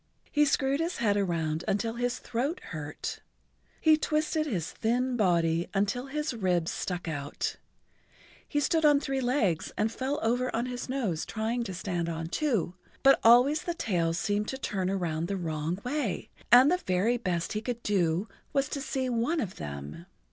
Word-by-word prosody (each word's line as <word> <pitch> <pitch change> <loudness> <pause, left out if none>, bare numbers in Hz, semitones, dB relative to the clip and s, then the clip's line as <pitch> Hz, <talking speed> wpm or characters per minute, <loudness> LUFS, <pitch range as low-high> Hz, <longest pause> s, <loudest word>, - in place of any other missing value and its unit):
He 295 0 +4
screwed 275 0 +1
his 335 +2 -1
head 210 -4 +2
around 165 -5 0
until 225 +3 0
his 245 +1 -1
throat 270 +9 -2
hurt, 150 -4 -5 0.6
he 315 -1 +5
twisted 310 0 0
his 180 - -2
thin 250 +3 0
body 170 -5 +2
until 205 +7 0
his 300 +1 -2
ribs 180 -7 0
stuck 180 -2 -3
out, 145 -2 -3 0.9
he 290 - 0
stood 320 +2 +2
on 295 -2 +6
three 270 -1 -2
legs 240 - +1
and 215 +1 +1
fell 265 +4 -2
over 245 +3 +1
on 235 +2 0
his 250 0 -5
nose 220 - -1
trying 230 +2 -2
to 190 - -5
stand 175 -2 -2
on 165 0 -4
two, 225 - 0 0.3
but 275 0 +7
always 250 +6 +6
the 345 - -3
tails 170 - 0
seemed 205 +3 0
to 265 - -3
turn 190 -8 -2
around 170 -4 -1
the 200 - -2
wrong 160 0 -2
way, 250 -7 -2 0.2
and 255 +5 +8
the 360 - +3
very 210 - +1
best 180 -6 -2
he 215 - -2
could 235 0 -4
do 180 -1 +1 0.3
was 275 -1 +2
to 280 - -3
see 265 -2 -2
one 250 +7 0
of 200 -9 -3
them. 75 - -7
225 Hz, 175 wpm, -29 LUFS, 175-270 Hz, 0.9 s, and